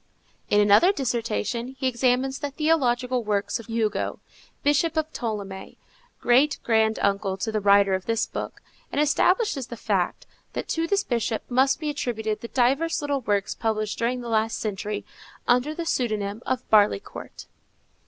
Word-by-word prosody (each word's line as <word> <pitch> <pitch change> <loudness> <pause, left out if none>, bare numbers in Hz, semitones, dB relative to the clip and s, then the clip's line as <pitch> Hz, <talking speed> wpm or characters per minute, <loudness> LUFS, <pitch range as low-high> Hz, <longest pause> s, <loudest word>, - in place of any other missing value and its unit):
In 205 - +4
another 210 - +6
dissertation, 240 - -2
he 265 - -3
examines 255 +2 +1
the 290 - -3
theological 255 -5 +1
works 205 +2 -1
of 230 - -11
Hugo, 225 -2 -1 0.4
Bishop 300 +3 +2
of 315 0 -1
Ptolemaïs, 200 -4 -5 0.4
great 270 +5 +3
grand 220 -1 +2
uncle 200 -1 0
to 220 +3 -2
the 215 - 0
writer 200 -1 +5
of 190 0 -2
this 230 0 +1
book, - - -6 0.3
and - - -1
establishes 300 - +2
the 235 - -8
fact, - - -1 0.3
that - - -4
to 330 0 0
this 400 +2 +1
bishop 230 - -1
must 265 +2 +3
be 305 -2 -2
attributed 220 -6 -3
the 235 - -6
divers 270 +7 +1
little 285 -2 -1
works 205 -3 0
published 215 -1 -2
during 245 +2 0
the 240 - -7
last 225 0 0
century, 210 0 -4 0.4
under 250 +6 +2
the 335 - -4
pseudonym 215 -7 -1
of 255 -1 -2
Barleycourt. 210 - +1
240 Hz, 155 wpm, -25 LUFS, 215-275 Hz, 0.4 s, another